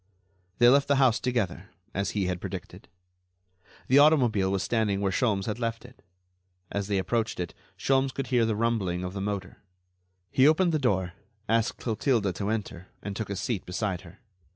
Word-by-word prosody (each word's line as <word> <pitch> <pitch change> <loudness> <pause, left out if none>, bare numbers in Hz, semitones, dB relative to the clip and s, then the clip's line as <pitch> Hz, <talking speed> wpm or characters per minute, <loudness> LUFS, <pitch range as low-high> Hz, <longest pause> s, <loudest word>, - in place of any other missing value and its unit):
They 120 - +6
left 140 +3 +5
the 140 - +3
house 130 -4 +4
together, 100 -7 -2 0.2
as 100 0 -1
he 100 - +1
had 90 -1 -2
predicted. - - -7 1.0
The 135 +3 +6
automobile 125 -11 +4
was 95 -1 0
standing 110 -4 0
where 100 -1 0
Sholmes 100 -3 +1
had 110 +1 -3
left 115 0 -3
it. 125 +1 -16 0.7
As 100 -1 -2
they 100 -1 0
approached 115 +3 -1
it, 90 -1 -3 0.2
Sholmes 135 0 +2
could 135 0 -4
hear 120 -2 +4
the 110 - 0
rumbling 105 -6 0
of 90 0 -4
the 100 - -4
motor. 100 -2 -4 0.7
He 130 +2 +5
opened 170 +3 +4
the 155 - +1
door, 95 -9 0 0.3
asked 115 +1 +1
Clotilde 115 -4 0
to 100 +3 -3
enter, 100 -5 -4 0.2
and 100 0 -5
took 110 -1 -4
a 100 - -2
seat 100 +1 -2
beside 90 0 -3
her. 90 +2 -14
110 Hz, 180 wpm, -27 LUFS, 95-125 Hz, 1.0 s, They